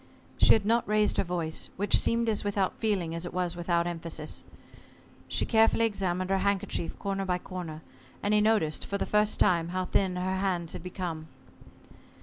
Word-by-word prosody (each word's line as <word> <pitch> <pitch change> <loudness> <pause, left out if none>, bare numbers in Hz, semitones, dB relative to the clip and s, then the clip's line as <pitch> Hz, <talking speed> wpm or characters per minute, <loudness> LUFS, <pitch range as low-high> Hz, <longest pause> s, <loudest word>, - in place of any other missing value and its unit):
She - - +7
had 215 -3 +1
not 230 +2 +2
raised 210 0 +2
her - - +3
voice, 170 -3 -2
which 205 +2 +2
seemed 230 0 +2
as 215 -2 0
without 200 -2 -1
feeling 195 -7 0
as 165 0 -4
it 175 - -6
was 180 -1 -1
without 170 0 0
emphasis. 165 -2 -4 0.8
She - - 0
carefully 225 0 +4
examined 185 -3 -1
her 195 - +2
handkerchief 195 -4 -1
corner 195 -1 -2
by 180 -2 0
corner, 175 -4 -7 0.4
and 205 - +2
he 210 - +5
noticed 210 -8 +2
for 200 - -3
the - - -1
first 210 0 +2
time 170 -4 +3
how 185 +1 -2
thin 185 0 +1
her 185 +1 -1
hands 180 -4 -1
had - - -5
become. 175 -3 -5
185 Hz, 180 wpm, -29 LUFS, 170-205 Hz, 0.8 s, She